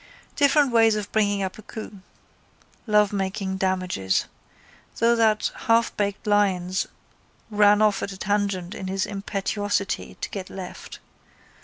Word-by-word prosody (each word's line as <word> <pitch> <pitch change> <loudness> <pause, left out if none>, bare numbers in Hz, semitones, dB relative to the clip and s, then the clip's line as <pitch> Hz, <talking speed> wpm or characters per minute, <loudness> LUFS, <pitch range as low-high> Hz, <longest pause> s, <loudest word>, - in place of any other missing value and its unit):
Different 285 -1 +4
ways 225 -2 +5
of 210 -1 -4
bringing 205 -2 +1
off 190 +2 -5
a - - -8
coup. 215 -1 -9 0.9
Lovemaking 195 -2 +1
damages. 185 - 0 0.7
Though 235 +1 +4
that 220 -2 +2 0.2
halfbaked 230 -3 +1
Lyons 190 -3 +1 0.6
ran 210 0 +5
off 210 -2 +2
at 200 - -3
a 190 - -8
tangent 200 -2 -1
in 190 - -6
his 190 0 -1
impetuosity 200 0 -2
to - - -4
get 190 -2 -6
left. 190 -2 -8
205 Hz, 125 wpm, -24 LUFS, 190-215 Hz, 0.9 s, ways